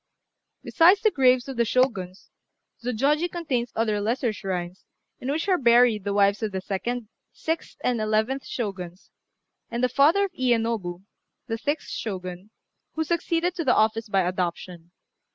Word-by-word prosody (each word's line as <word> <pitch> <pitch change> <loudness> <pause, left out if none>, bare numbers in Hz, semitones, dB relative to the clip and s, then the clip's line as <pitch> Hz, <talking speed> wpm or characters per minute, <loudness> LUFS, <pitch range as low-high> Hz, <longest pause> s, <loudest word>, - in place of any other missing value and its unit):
Besides 360 +4 +5
the 435 - +3
graves 255 -4 +3
of 270 -2 -6
the 235 - +4
Shoguns, 220 -7 -1 0.5
Zôjôji 285 +8 +1
contains 270 -9 -2
other 215 -2 0
lesser 230 +2 0
shrines, 185 -3 -5 0.4
in 260 - -3
which 320 +6 -2
are 370 -2 +3
buried 235 -4 +4
the 200 - -1
wives 200 +1 +3
of 215 -2 -2
the 190 - -3
second, 220 +5 -3 0.2
sixth, 325 +1 -4
and 240 -3 +1
eleventh 220 +5 0
Shoguns, 190 -6 -6 0.6
and 240 +1 -3
the 255 - +3
father 320 +10 +4
of 390 - -7
Iyénobu, 230 - -1 0.4
the 225 -2 -4
sixth 290 +6 -2
Shogun, 185 -2 -5 0.4
who 320 - -1
succeeded 340 +2 0
to 345 - -3
the 260 - +3
office 220 +1 +1
by 195 -1 +2
adoption. 175 -1 -3
235 Hz, 155 wpm, -25 LUFS, 200-275 Hz, 0.6 s, Besides